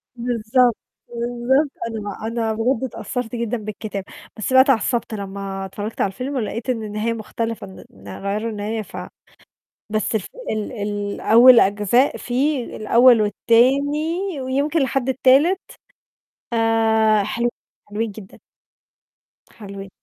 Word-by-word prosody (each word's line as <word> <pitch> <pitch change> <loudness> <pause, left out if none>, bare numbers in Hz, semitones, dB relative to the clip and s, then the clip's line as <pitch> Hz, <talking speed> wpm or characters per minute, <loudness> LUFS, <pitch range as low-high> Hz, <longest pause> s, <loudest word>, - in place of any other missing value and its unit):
بالضبط، 240 0 +1 0.3
بالضبط. 240 +4 0 0.2
أنا 225 -1 -5
ما 205 +2 -6
أنا 225 -1 -1
بجد 230 +3 0
اتأثرت 250 -1 -4
جدًا 235 0 -2
بالكتاب. 210 -2 -6 0.3
بس 215 +4 -3
بقى 260 - +9
اتعصبت 240 -3 +1
لما 195 -1 -5
اتفرجت 205 +3 -5
على - - +3
الفيلم 260 +7 -5
ولقيت 230 +1 -3
إن 225 -3 -1
النهاية 215 +2 -2
مختلفة 225 -1 -4
إن 190 - -12
إن 100 0 -16 0.2
غيروا 210 +3 -2
النهاية 215 +1 -3
ف - - -10 0.9
بس 215 +1 -1
ف 195 - -7 0.2
ال 215 -1 -3
الأول 210 +3 +4
أجزاء 210 +6 +2
فيه 255 +1 -1
الأول 235 +1 +5
والتاني، 285 - +1
ويمكن 280 +5 0
لحد 265 0 -1
التالت 275 +9 +4 0.9
آآ 220 -2 +3
حلوين، 235 +3 -1 0.4
حلوين 215 +1 -2
جدًا. 195 -2 -13 1.1
حلوين. 195 -2 -9
230 Hz, 125 wpm, -21 LUFS, 210-255 Hz, 1.1 s, بقى